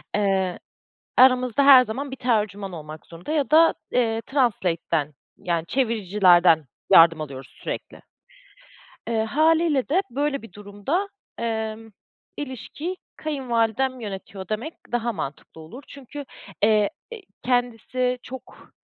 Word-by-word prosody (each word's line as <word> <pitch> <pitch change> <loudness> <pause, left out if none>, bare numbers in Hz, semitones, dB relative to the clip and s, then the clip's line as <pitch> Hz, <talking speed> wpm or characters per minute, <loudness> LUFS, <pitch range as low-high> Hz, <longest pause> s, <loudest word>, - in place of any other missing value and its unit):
Eee, 190 -3 0 0.6
aramızda 255 +1 +5
her 260 -3 +9
zaman 265 +5 -5
bir - - -4
tercüman 210 -6 -1
olmak 155 -1 -9
zorunda 170 - -9
ya 290 -4 0
da, 325 +1 +6 0.2
eee, 225 -2 +1
translate'den 170 - 0 0.2
yani 170 -2 -2
çeviricilerden 185 - +3 0.3
yardım 165 -1 +7
alıyoruz 135 -3 -8
sürekli. - - -6 1.1
Eee, 225 -1 +1
hâliyle 310 +2 +2
de 350 +7 +2
böyle 280 +2 -1
bir 225 - -13
durumda, 205 - -3 0.3
emm, 220 -1 -3 0.5
ilişkiyi 290 +6 -6 0.2
kayınvalidem 255 -3 -1
yönetiyor 195 -2 -7
demek 230 +10 -4 0.2
daha 240 0 0
mantıklı 150 -3 -7
olur. 170 - -11
Çünkü, 280 +1 -9 0.4
eee, 210 -1 +4 0.2
i 455 - -9 0.2
kendisi 250 0 0
çok 260 0 -11
230 Hz, 115 wpm, -24 LUFS, 195-265 Hz, 1.1 s, her